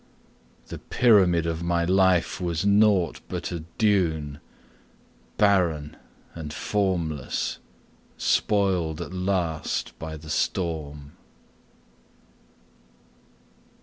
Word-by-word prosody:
The -, -, -7 dB
pyramid 95 Hz, -9 st, +3 dB
of 85 Hz, 0 st, -2 dB
my 85 Hz, 0 st, 0 dB
life 95 Hz, -1 st, +2 dB
was 85 Hz, 0 st, -1 dB
nought 100 Hz, -4 st, +3 dB
but -, -, -4 dB
a 85 Hz, -, -3 dB, 0.2 s
dune, 80 Hz, -9 st, +1 dB, 1.0 s
Barren 85 Hz, -8 st, +2 dB, 0.4 s
and 80 Hz, -3 st, -7 dB
formless, 85 Hz, -7 st, -2 dB, 0.6 s
spoiled 95 Hz, -7 st, +1 dB
at -, -, -6 dB
last 90 Hz, -4 st, -2 dB
by 80 Hz, 0 st, -6 dB
the 75 Hz, 0 st, -9 dB
storm. 75 Hz, -6 st, -2 dB
85 Hz, 80 wpm, -25 LUFS, 80-95 Hz, 1.0 s, pyramid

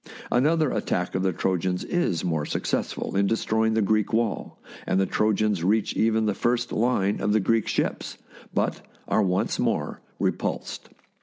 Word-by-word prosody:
Another 155 Hz, +3 st, +3 dB
attack 90 Hz, 0 st, -1 dB
of 95 Hz, -, 0 dB
the 95 Hz, 0 st, +2 dB
Trojans 90 Hz, 0 st, -1 dB
is 175 Hz, -, 0 dB
more 80 Hz, -4 st, 0 dB
success -, -, -1 dB
ful -, -, -5 dB
in 100 Hz, 0 st, +3 dB
destroying 110 Hz, 0 st, +1 dB
the 110 Hz, -, +2 dB
Greek 105 Hz, +1 st, +1 dB
wall, 115 Hz, -2 st, -1 dB, 0.3 s
and 95 Hz, -, +2 dB
the 95 Hz, -, +3 dB
Trojans 105 Hz, -3 st, +1 dB
reach 105 Hz, +4 st, +2 dB
even 110 Hz, 0 st, +2 dB
the 105 Hz, -, +1 dB
first 120 Hz, +3 st, 0 dB
line 105 Hz, -4 st, +1 dB
of 105 Hz, +1 st, +1 dB
the 110 Hz, -, +4 dB
Greek 115 Hz, +2 st, +1 dB
ships, -, -, -2 dB, 0.3 s
but -, -, -1 dB, 0.3 s
are -, -, +2 dB
once 95 Hz, -2 st, 0 dB
more -, -, -1 dB, 0.2 s
repulsed. -, -, -2 dB
105 Hz, 165 wpm, -25 LUFS, 95-110 Hz, 0.3 s, the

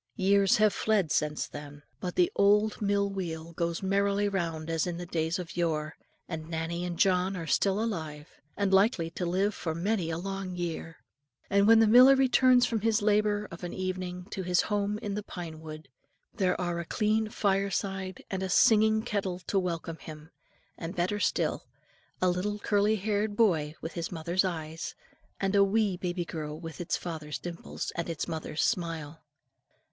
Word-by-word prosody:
Years 200 Hz, -1 st, +4 dB
have 215 Hz, -1 st, +4 dB
fled 205 Hz, -7 st, +1 dB
since 150 Hz, 0 st, 0 dB
then, 145 Hz, 0 st, -10 dB, 0.2 s
but 180 Hz, -1 st, -4 dB
the 180 Hz, -, +3 dB
old 210 Hz, +2 st, +3 dB
mill 200 Hz, 0 st, +2 dB
wheel 170 Hz, -4 st, -5 dB
goes 170 Hz, +1 st, -2 dB
merrily 200 Hz, +1 st, +2 dB
round 165 Hz, -5 st, -2 dB
as 165 Hz, +1 st, 0 dB
in 175 Hz, -1 st, -3 dB
the 175 Hz, -, -5 dB
days 165 Hz, 0 st, -1 dB
of 180 Hz, -3 st, -7 dB
yore; 160 Hz, -3 st, -1 dB, 0.3 s
and 160 Hz, -2 st, -6 dB
Nannie 165 Hz, +1 st, -3 dB
and 175 Hz, -1 st, -4 dB
John 185 Hz, +1 st, +2 dB
are 165 Hz, -, -4 dB
still 195 Hz, +4 st, +2 dB
alive, 160 Hz, -9 st, -3 dB, 0.3 s
and 200 Hz, -1 st, +1 dB
likely 190 Hz, -4 st, +3 dB
to 175 Hz, +1 st, -3 dB
live 195 Hz, +4 st, +1 dB
for 160 Hz, -5 st, -4 dB
many 185 Hz, 0 st, 0 dB
a 160 Hz, -, -2 dB
long 195 Hz, 0 st, -4 dB
year. 165 Hz, -2 st, -4 dB, 0.5 s
And 200 Hz, +1 st, +4 dB
when 225 Hz, 0 st, +8 dB
the 225 Hz, -, +6 dB
miller 250 Hz, +5 st, +8 dB
returns 255 Hz, -1 st, +5 dB
from 225 Hz, -3 st, -1 dB
his 220 Hz, -1 st, +2 dB
labour 210 Hz, 0 st, +2 dB
of 170 Hz, +2 st, -9 dB
an 175 Hz, -, -5 dB
evening 185 Hz, -1 st, -4 dB
to 195 Hz, -, -3 dB
his 180 Hz, -1 st, +2 dB
home 205 Hz, 0 st, -1 dB
in 205 Hz, -2 st, -2 dB
the 210 Hz, -, -2 dB
pine 170 Hz, -5 st, -8 dB
wood, 155 Hz, 0 st, -9 dB, 0.5 s
there 190 Hz, -5 st, 0 dB
are 175 Hz, -1 st, -1 dB
a 170 Hz, -, -4 dB
clean 215 Hz, +4 st, +1 dB
fireside 195 Hz, -2 st, -1 dB
and 190 Hz, -1 st, -2 dB
a 190 Hz, -, -2 dB
singing 220 Hz, +1 st, +4 dB
kettle 200 Hz, -6 st, -2 dB
to 195 Hz, +2 st, 0 dB
welcome 170 Hz, -2 st, -3 dB
him; 155 Hz, +1 st, -11 dB, 0.5 s
and 170 Hz, +3 st, -5 dB
better 185 Hz, +4 st, 0 dB
still, -, -, 0 dB, 0.5 s
a 185 Hz, -, +2 dB
little 185 Hz, +4 st, 0 dB
curly 205 Hz, +1 st, +2 dB
haired 210 Hz, +1 st, -1 dB
boy 165 Hz, -9 st, +2 dB
with 160 Hz, -, -5 dB
his 170 Hz, -2 st, -4 dB
mother's 170 Hz, +2 st, 0 dB
eyes, 160 Hz, -3 st, -4 dB, 0.4 s
and 195 Hz, 0 st, 0 dB
a 200 Hz, -1 st, +6 dB
wee 200 Hz, -1 st, +2 dB
baby 175 Hz, -1 st, -3 dB
girl 155 Hz, -2 st, -5 dB
with 165 Hz, 0 st, -7 dB
its 175 Hz, -, -1 dB
father's 155 Hz, -5 st, -5 dB
dimples 170 Hz, +5 st, -6 dB
and 170 Hz, 0 st, -3 dB
its 165 Hz, -2 st, -3 dB
mother's 160 Hz, -2 st, -3 dB
smile. 165 Hz, -6 st, -2 dB
185 Hz, 180 wpm, -29 LUFS, 165-205 Hz, 0.5 s, when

